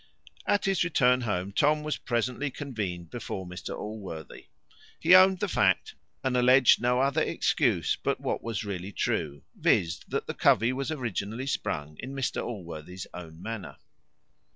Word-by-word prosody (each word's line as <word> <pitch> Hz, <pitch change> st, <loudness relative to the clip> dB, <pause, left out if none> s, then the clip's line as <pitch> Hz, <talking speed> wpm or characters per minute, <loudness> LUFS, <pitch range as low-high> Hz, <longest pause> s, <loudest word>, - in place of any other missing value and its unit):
At 205 Hz, -, +2 dB
his 195 Hz, -2 st, +2 dB
return 125 Hz, -7 st, +3 dB
home, 100 Hz, -4 st, -2 dB
Tom 150 Hz, +8 st, +2 dB
was 155 Hz, 0 st, -2 dB
presently 125 Hz, +4 st, -1 dB
convened 105 Hz, -, -5 dB
before 100 Hz, -5 st, -5 dB
Mr 90 Hz, 0 st, -6 dB
Allworthy. 95 Hz, -8 st, -7 dB, 0.5 s
He 170 Hz, +3 st, +5 dB
owned 185 Hz, +1 st, +8 dB
the 205 Hz, -, +1 dB
fact, 95 Hz, -, +2 dB, 0.3 s
and 130 Hz, -1 st, 0 dB
alledged 125 Hz, 0 st, +6 dB
no 125 Hz, +1 st, +2 dB
other 140 Hz, +4 st, +2 dB
excuse 120 Hz, -, +1 dB
but -, -, 0 dB
what -, -, -2 dB
was 115 Hz, -2 st, -3 dB
really 95 Hz, -1 st, -5 dB
true, 70 Hz, -6 st, -2 dB
viz., 85 Hz, +1 st, +2 dB
that -, -, -2 dB
the -, -, -4 dB
covey 115 Hz, +4 st, +3 dB
was 135 Hz, +2 st, -3 dB
originally 120 Hz, -, -3 dB
sprung 75 Hz, -, -3 dB
in 135 Hz, +2 st, -6 dB
Mr 135 Hz, -2 st, -1 dB
Allworthy's 90 Hz, -4 st, -7 dB
own 80 Hz, -2 st, -9 dB
manor. 115 Hz, -3 st, -6 dB
115 Hz, 150 wpm, -28 LUFS, 90-135 Hz, 0.5 s, owned